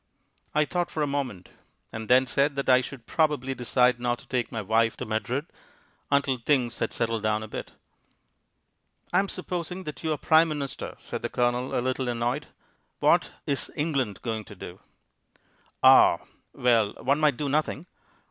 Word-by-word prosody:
I 150 0 +4
thought 175 +1 -1
for 155 - -2
a 140 -1 -1
moment, 125 -11 -4 0.4
and 110 -1 -7
then 130 +1 +6
said 140 +2 +1
that 140 - -2
I 130 -1 +6
should 130 -2 -9
probably 150 -4 +1
decide 125 0 +2
not 120 0 0
to - - -17
take 125 -2 -1
my 115 -2 -3
wife 115 +2 +2
to - - -5
Madrid 120 +6 -2 0.6
until 140 -2 +2
things 120 -2 +1
had - - -1
settled 115 -2 -1
down 110 0 0
a - - -7
bit. - - -7 1.4
"I'm 190 +2 +3
supposing 180 0 -4
that 150 -1 -8
you're 155 -2 0
Prime 160 +3 +4
Minister," 145 -4 -4
said - - -6
the - - -3
Colonel, 125 +1 0
a - - +1
little 130 0 -1
annoyed. 120 +4 -1 0.5
"What - - +3 0.2
is 140 -4 -1
England 140 - -1
going 110 -2 -2
to 105 - -12
do?" 90 0 -9 1.0
"Ah!... - - +8 0.3
Well, 115 -4 +2
one 140 +3 0
might 150 -5 +3
do 145 - -2
nothing. 150 +2 -1
130 Hz, 165 wpm, -26 LUFS, 115-150 Hz, 1.4 s, Ah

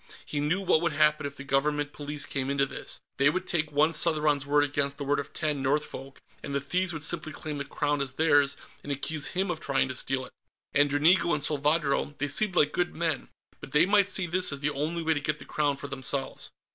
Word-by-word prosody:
He 145 - -3
knew 160 +7 +1
what 160 - +4
would 170 -3 0
happen 150 -1 +3
if 140 - -10
the 140 - -7
Government 145 +2 0
Police 145 0 -3
came 135 -1 -2
into 140 0 +2
this. - - -6 0.2
They 140 +1 +5
would 185 +5 -2
take 155 -4 -1
one 150 +3 +3
Southron's 150 -3 +2
word 145 0 +4
against 140 -1 -1
the 145 - -5
word 145 +1 +1
of 140 - -6
ten 150 -3 -2
Northfolk, 135 -1 -2 0.3
and 140 - -4
the - - +2
thieves 180 +6 -1
would 155 -3 -3
simply 155 0 -1
claim 150 0 -6
the 140 - -3
Crown 145 0 -1
as 135 -2 -2
theirs 145 -2 +3 0.2
and 145 - -6
accuse 145 +2 0
him 190 0 -1
of 160 - -4
trying 140 -4 0
to 130 - -4
steal 130 0 -1
it. - - -16 0.4
And 145 0 +4
Dranigo 160 +4 +3
and 145 - -2
Salvadro 145 -1 0
they 145 +1 -2
seemed 190 +6 +2
like 150 -3 +4
good 175 +2 -1
men, 160 -5 -2 0.3
but 135 - -11
they 150 +3 +6
might 200 0 +4
see 190 -1 -1
this 180 +1 +2
as 140 - -3
the 145 +1 0
only 160 +4 -2
way 160 0 +2
to 150 - -2
get 150 +1 -1
the - - -12
Crown 145 -2 0
for 140 - -6
themselves.... 135 0 -4
145 Hz, 235 wpm, -28 LUFS, 140-160 Hz, 0.4 s, they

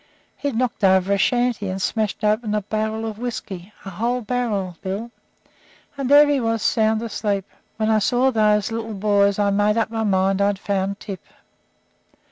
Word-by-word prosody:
He'd 285 -4 -3
knocked 240 -3 -1
over 190 0 +4
a - - +2
shanty 240 -3 +1
and 190 +1 -3
smashed 215 +2 -2
open 215 0 +1
a 210 - -1
barrel 220 +2 -2
of 220 -1 -5
whisky 215 -6 -6
a 195 - -6
whole 240 +6 -1
barrel, 215 -6 -2
Bill 200 +5 -4 0.8
and 275 -2 -3
there 290 +1 +7
he 290 -1 +2
was 225 -2 -1
sound 220 0 +2
asleep. 205 -3 -2 0.3
When 220 0 +1
I 215 - +4
saw 245 +6 +2
those 210 -1 +2
little 225 -1 -4
boys 200 0 +2
I 205 -1 +2
made 205 +2 +2
up 225 -1 0
my 225 -1 -2
mind 195 -1 +1
I'd 200 0 +2
found 200 0 -2
Tip. 195 -5 -7
215 Hz, 175 wpm, -22 LUFS, 200-230 Hz, 0.8 s, there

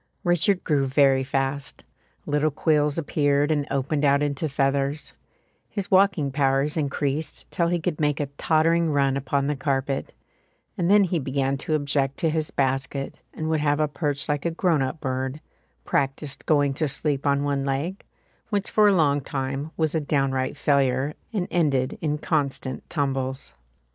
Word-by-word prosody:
Richard 175 +2 +2
grew 140 -3 +1
very 135 0 +4
fast; 135 +1 -2 0.4
little 150 +1 +1
quills 150 0 +1
appeared 145 -2 +1
and 145 -2 0
opened 140 +2 -1
out 140 0 +4
into 145 +2 -1
feathers; 140 +2 -1 0.6
his 200 -2 -5
walking 185 -7 +3
powers 135 +1 +1
increased 145 0 -2
till 170 - +1
he 175 0 0
could 165 -2 -2
make 150 -2 +1
a 145 - 0
tottering 165 +2 +2
run 140 -2 +2
upon 140 0 0
the 145 +1 0
carpet; 135 0 -2 0.6
and 175 -1 0
then 205 0 +6
he 180 -2 0
began 135 0 -1
to 155 +3 -1
object 140 -2 0
to 165 -3 +1
his 155 -1 -1
basket 135 0 -2 0.2
and 155 - -3
would 160 -1 +1
have 145 0 +1
a 155 - +2
perch 145 -1 -2
like 145 -1 -1
a 170 - +1
grown 165 -2 +1
up 135 +4 -2
bird, 130 0 -3 0.5
practised 135 +1 -2
going 145 -3 +3
to 155 +3 -1
sleep 145 0 -1
on 140 0 +2
one 140 -1 0
leg, 140 +8 -2 0.5
which 205 -2 -1
for 215 -1 +5
a 205 - +5
long 145 -5 +3
time 135 +2 -3
was 160 -2 +1
a 160 - +1
downright 135 -2 0
failure 140 -1 +1 0.2
and 200 -6 -2
ended 140 -7 +1
in 150 -2 0
constant 140 -4 -2
tumbles. 135 - -2
145 Hz, 165 wpm, -24 LUFS, 135-155 Hz, 0.6 s, then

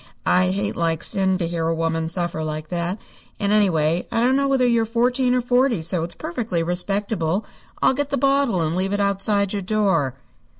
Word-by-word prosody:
I 185 0 +3
hate 200 +2 -1
like 165 -2 -1
sin 190 -1 +1
to 170 -3 -1
hear 165 -1 -2
a 165 - 0
woman 165 0 -1
suffer 170 -2 -2
like 155 0 -5
that, 175 +2 -2 0.4
and, 200 -1 0
anyway, 170 -5 +2
I - - 0
don't 250 +3 +3
know 275 0 +2
whether 265 -2 +2
you're 235 -2 +3
fourteen 245 +3 +1
or 250 - +2
forty, 245 -5 +2
so 165 +1 -1
it's 170 - -6
perfectly 175 -3 -3
respectable. 190 +1 -1 0.4
I'll - - +5
get 285 +1 -2
the 280 - -1
bottle 275 -10 +2
and 160 +1 -1
leave 190 +2 -1
it 205 - 0
outside 200 0 +1
your 205 - -2
door." 190 - +1
195 Hz, 200 wpm, -22 LUFS, 165-230 Hz, 0.4 s, I'll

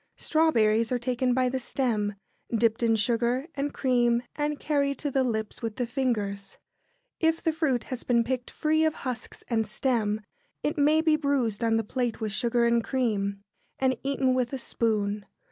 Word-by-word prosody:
[Sidenote: - - -29
Strawberries.] 230 -9 +3
Strawberries - - -8
are - - +2
taken 250 +1 0
by 255 -1 +2
the 260 +1 -2
stem, 220 -6 -1 0.4
dipped 230 0 +2
in 230 -1 +3
sugar 235 +5 +1
and 285 +1 -2
cream, 240 -2 +2
and 295 0 -1
carried 280 -2 0
to 290 - -2
the 270 0 +2
lips 220 -4 -3
with 225 -2 -3
the 245 - -1
fingers. 210 -6 -2 0.6
If 325 0 +1
the 325 - +1
fruit 280 -7 0
has 255 -2 -6
been 235 -2 +3
picked 250 +1 -3
free 315 +1 +1
of 315 -1 +2
husks 250 -2 -5
and 225 -3 0
stem, 215 -2 0 0.4
it 300 - 0
may 300 +2 +4
be 315 -1 +3
bruised 260 -7 0
on 225 -1 +3
the 225 - 0
plate 240 +1 -2
with 220 -2 -2
sugar 235 +2 +1
and 235 0 +3
cream, 200 -7 -1 0.3
and 260 -1 +2
eaten 270 -1 +1
with 250 -1 0
a - - -1
spoon. 210 -4 -1
245 Hz, 185 wpm, -27 LUFS, 225-275 Hz, 0.6 s, may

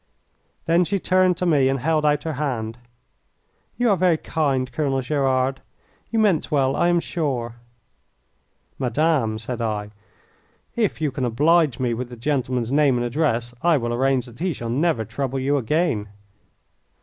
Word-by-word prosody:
Then 170 +2 +3
she 200 +3 -1
turned 185 -1 +2
to 180 - -1
me 145 -6 +3
and 135 0 0
held 155 +2 +1
out 150 0 +1
her 160 - -3
hand. 120 -5 -3 1.0
"You 245 -2 +2
are - - +4
very 180 -2 +3
kind, 135 -6 -1
Colonel 135 +1 0
Gerard. 135 -1 0 0.5
You 230 - -2
meant 205 -8 +2
well, 135 -2 +1
I 175 - +2
am 175 0 +3
sure." 130 -9 -3 1.2
"Madame," 130 -3 +1
said 115 +2 -5
I, 105 -2 -3 0.8
"if 215 -8 0
you 150 -3 0
can 130 0 -4
oblige 150 +5 +2
me 125 -2 0
with 120 +1 -4
the 125 - -9
gentleman's 125 -2 -1
name 140 -3 +3
and 120 - -1
address 120 -3 -1
I 170 -2 +4
will 120 -2 -2
arrange 130 0 +1
that 120 0 -14
he 180 0 -1
shall 120 -4 -6
never 140 -3 +1
trouble 135 +4 -3
you 140 +2 +1
again." 140 -5 0
135 Hz, 160 wpm, -22 LUFS, 120-160 Hz, 1.2 s, are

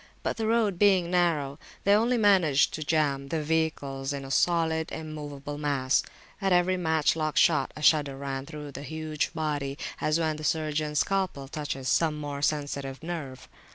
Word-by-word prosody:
But - - -2
the 220 -1 -1
road 220 -5 +1
being 190 -4 +4
narrow, 160 -5 +1 0.2
they 200 - +4
only 235 +4 +3
managed 185 -10 +4
to 155 - -3
jam 145 -3 0
the 155 +2 -2
vehicles 145 -3 -1
in 140 -1 -5
a 135 - -7
solid 160 0 +1
immovable 145 -2 -6
mass. 140 -3 +1 0.4
At 195 -1 +1
every 180 +1 +3
match 160 -4 +1
lock 155 -1 -2
shot, 160 -3 +4
a 150 - -8
shudder 145 -3 +3
ran 135 0 -4
through 150 -2 -8
the 140 - -8
huge 155 0 -3
body, 145 -3 -2 0.2
as 155 +2 +1
when 155 -2 0
the 155 - -8
surgeons 155 -1 -1
scalpel 190 -8 -1
touches 140 -2 -4
some 155 +2 +2
more 145 -1 -5
sensitive 145 -1 -2
nerve. 155 -7 -6
155 Hz, 170 wpm, -27 LUFS, 140-165 Hz, 0.4 s, being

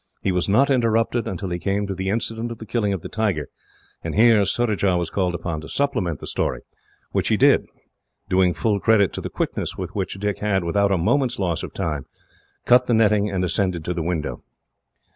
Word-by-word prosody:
He 95 - +1
was 90 +1 0
not 135 +8 +4
interrupted, 115 -2 +1
until 95 0 -4
he 85 - -2
came 100 +2 -1
to 100 - -3
the 95 0 -3
incident 115 +2 -2
of 115 - -6
the 110 - -9
killing 110 -3 0
of 95 -4 -3
the - - -5
tiger, 100 -10 -1 0.5
and - - -4
here 110 -1 +5
Surajah 100 -4 +1
was 85 -2 -2
called 90 -3 0
upon 85 -2 -4
to 80 - -10
supplement 95 - 0
the - - -8
story, - - -2 0.5
which - - 0
he - - +2
did, - - +4 0.6
doing 90 -1 +2
full 105 -3 0
credit 105 -2 +3
to - - -4
the - - -5
quickness - - -3
with - - -5
which - - -3
Dick 105 0 -2
had, 100 -3 0
without 100 +4 +1
a 95 - +3
moment's 125 +8 +1
loss 90 -5 -1
of - - -6
time, 75 -4 -3 0.6
cut 125 +1 +5
the 120 - +3
netting 105 -2 +3
and 95 -2 -1
ascended 90 -2 -1
to 90 - -1
the 85 - -3
window. 80 -2 -3
100 Hz, 210 wpm, -22 LUFS, 90-110 Hz, 0.6 s, here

